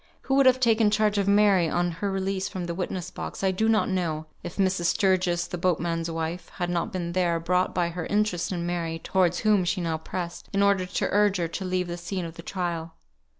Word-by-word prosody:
Who 270 - -2
would 275 -1 +5
have 255 0 +5
taken 225 -3 +4
charge 210 -1 +2
of 200 - 0
Mary 200 -4 +4
on 175 +1 0
her 200 - 0
release 195 0 -2
from 185 -2 -4
the 170 - -3
witness 185 0 -4
box - - -6
I 190 - +3
do 220 +4 +1
not 220 -1 +3
know, 165 -5 -1 0.2
if 175 - -7
Mrs. 190 -3 +1
Sturgis, 185 -2 +2
the 180 - -6
boatman's 170 -1 0
wife, 165 +2 -4
had 175 0 -2
not 175 +5 -1
been 175 -3 -3
there, 175 -2 +1
brought 180 +2 0
by 175 -1 +1
her 170 -1 -5
interest 205 -5 0
in 175 -2 -2
Mary, 170 -2 -2
towards 180 0 +1
whom 210 -3 +3
she 185 +2 0
now 165 -2 -1
pressed, 170 +1 -6
in 200 0 +3
order 195 -2 +2
to 180 - -1
urge 205 -1 +3
her 170 -2 0
to 190 +3 -4
leave 180 -1 -1
the 175 0 -4
scene 175 +1 -4
of 165 - -7
the 170 - -10
trial. 170 -2 -4
180 Hz, 230 wpm, -26 LUFS, 170-195 Hz, 0.2 s, would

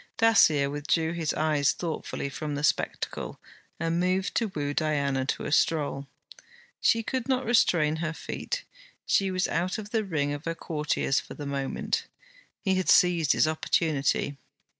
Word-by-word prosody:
Dacier 160 -11 +5
withdrew 155 +3 0
his 165 -3 -1
eyes 150 -2 +2
thoughtfully 165 -4 -4
from 145 +1 -4
the 145 - -4
spectacle, 150 - -1 0.4
and 165 +1 0
moved 185 +2 0
to 230 - +1
woo 145 -7 -3
Diana 140 -4 0
to - - -2
a - - -3
stroll. 145 -2 +1 0.7
She 230 0 +3
could 260 +1 -3
not 260 -1 +1
restrain 170 -9 +3
her 160 -1 -2
feet; - - -5 0.4
she 195 -1 +2
was 185 0 0
out 180 +2 -1
of 210 -1 -8
the 225 -2 +1
ring 145 -7 -1
of 145 +2 -7
her 165 0 -2
courtiers 150 -4 0
for - - -10
the 145 - -7
moment. 140 -1 -2 0.6
He 190 - +2
had 185 -4 0
seized 170 -4 +5
his - - +3
opportunity. 150 -3 0
160 Hz, 160 wpm, -27 LUFS, 145-185 Hz, 0.7 s, Dacier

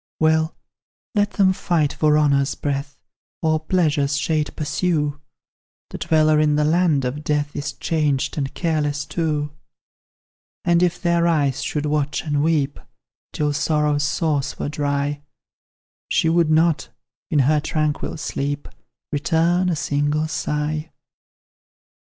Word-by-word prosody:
Well, 160 0 +2 0.6
let 205 -1 +1
them 190 -2 +4
fight 160 -5 0
for 150 -1 +3
honour's 140 -2 +2
breath, 140 0 -3 0.5
Or 155 -1 +2
pleasure's 155 -4 +1
shade 150 +3 0
pursue 150 -2 -1 0.7
The - - -6
dweller 155 -2 +3
in 150 -1 +3
the 150 - +2
land 160 -4 +2
of 140 +4 -3
death 145 -1 -1
Is 145 +1 -3
changed 150 -5 0
and 140 -3 -2
careless 150 -4 -1
too. 150 -2 -2 1.1
And, 170 -1 +3
if 180 -1 +1
their 170 -1 +2
eyes 145 -6 +1
should 150 -1 -2
watch 150 -1 -1
and 145 -2 0
weep 150 -3 +1 0.5
Till 150 -1 -1
sorrow's 150 0 +1
source 145 -1 0
were - - -3
dry, 145 0 -1 0.9
She 165 - +2
would 165 -1 +3
not, 160 0 +2 0.4
in 155 - +1
her 145 +2 +4
tranquil 155 +1 -2
sleep, 145 -1 -3 0.4
Return 165 +5 +2
a 170 - +1
single 145 +1 0
sigh! 150 +1 -2
150 Hz, 130 wpm, -22 LUFS, 145-160 Hz, 1.1 s, them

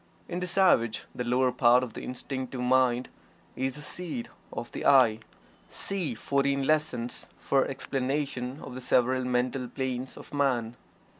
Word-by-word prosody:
In 175 - -3
the 180 - -3
savage 170 - +3
the 125 - -3
lower 125 +1 +2
part 125 0 +5
of 120 -3 -5
the - - -6
Instinctive 130 0 -5
Mind 125 0 +3 0.5
is 130 0 -1
the 150 - -8
seat 160 -8 -5 0.2
of - - -6
the - - -5
"I." 120 -5 +6 0.5
(See 180 -11 -2
"Fourteen 140 +2 +1
Lessons" 150 -6 0
for 135 -1 +2
explanation 135 0 -2
of - - -8
the 130 - -6
several 130 +1 +2
mental 125 +1 0
planes 130 0 -4
of - - -11
man.) 125 -5 +1
130 Hz, 150 wpm, -28 LUFS, 125-140 Hz, 0.5 s, I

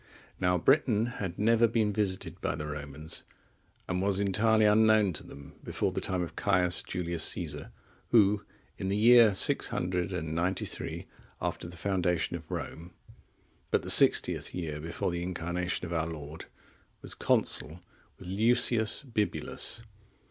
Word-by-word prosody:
Now 90 0 +2
Britain 115 - +2 0.2
had 90 -3 -4
never 115 +2 +3
been 110 -2 0
visited 95 -4 -2
by - - -1
the 75 0 -5
Romans, 75 +1 -4 0.6
and 90 0 -2
was 100 0 +1
entirely 110 +2 +2
unknown 105 -2 +4
to 75 - -4
them 70 -1 -13
before - - -2
the - - -3
time 90 -1 -1
of 85 - -8
Caius 90 -3 +2
Julius 85 -2 -3
Caesar, 75 -4 -3 0.4
who, 105 -3 +4 0.4
in 95 - -3
the 100 - 0
year 115 -2 +6
693 90 -1 -1 0.3
after - - -4
the 85 0 -11
foundation 90 -2 -1
of 80 -2 -9
Rome, 85 +2 -7 0.7
but - - +1
the - - +2
sixtieth - - +4
year(33) 80 -4 -5
before 85 +2 -3
the 85 0 -3
Incarnation 90 0 -3
of 85 - -6
our 80 -1 -1
Lord, 80 -1 -8 0.6
was - - -4
consul 80 +4 +1 0.4
with 95 - -13
Lucius 110 +4 +3
Bibulus. 115 -6 -3
90 Hz, 140 wpm, -29 LUFS, 85-105 Hz, 0.7 s, year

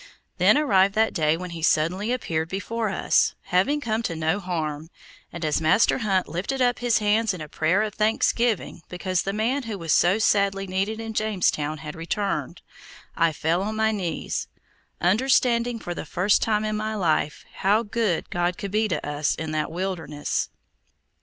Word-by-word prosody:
Then - - +5
arrived 200 -10 +3
that 220 +1 +2
day 155 -2 +2
when 180 0 -6
he 165 -1 -7
suddenly 175 +8 +1
appeared 165 -10 -2
before 220 +4 -2
us, 190 - +2
having 195 +12 +1
come 225 -5 -1
to 170 -7 -3
no 160 +4 0
harm, 160 -4 -4 0.4
and 170 -1 -5
as 155 +1 +1
Master 160 +11 +3
Hunt 195 -5 +1
lifted 185 - -3
up 245 -1 +2
his 240 -2 +2
hands 215 -1 +1
in - - -9
a 155 - -6
prayer 165 +7 +1
of 215 -1 -3
thanksgiving 220 -2 +1
because 185 0 -1
the 195 - -2
man 230 +7 0
who 225 -5 -5
was 165 -4 0
so 180 +4 +4
sadly 200 -2 +2
needed 195 +4 -2
in 225 0 -5
Jamestown 180 -8 0
had 150 +1 -7
returned, 195 +5 -3 0.5
I 165 -1 +3
fell 160 +4 0
on 215 +2 -3
my 220 0 +2
knees, 180 -7 -3 0.5
understanding 235 +3 +2
for 175 -5 -5
the - - -5
first 185 +7 +2
time 215 -1 +1
in 215 0 -1
my 215 +1 -2
life 160 -5 0
how 210 +4 +2
good 210 -5 -1
God 175 0 0
could 200 -2 -5
be 215 +1 +2
to 175 - -3
us 145 0 0
in 160 -1 -5
that 155 -1 -1
wilderness. 165 -5 -3
195 Hz, 180 wpm, -24 LUFS, 165-220 Hz, 0.5 s, Then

